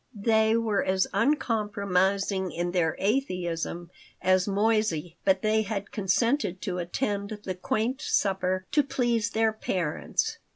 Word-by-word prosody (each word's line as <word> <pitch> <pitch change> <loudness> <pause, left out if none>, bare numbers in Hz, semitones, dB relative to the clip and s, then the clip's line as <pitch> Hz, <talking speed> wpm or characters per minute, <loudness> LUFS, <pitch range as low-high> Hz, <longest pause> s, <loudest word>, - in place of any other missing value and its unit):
They 220 +1 +3
were 220 -3 +1
as 190 0 +2
uncompromising 200 - +1
in 175 +1 -2
their 170 -3 +1
atheism 180 -7 -2 0.3
as 185 0 +2
Moissey, 200 -5 +1
but 190 -1 +2
they 215 0 +3
had 200 -1 -4
consented 205 0 +1
to 180 -4 -2
attend 200 +3 -2
the 185 - -3
quaint 220 +8 -1
supper 185 -2 0
to 295 - +4
please 240 -5 0
their 220 0 +1
parents. 180 -7 -2
200 Hz, 125 wpm, -27 LUFS, 185-220 Hz, 0.3 s, to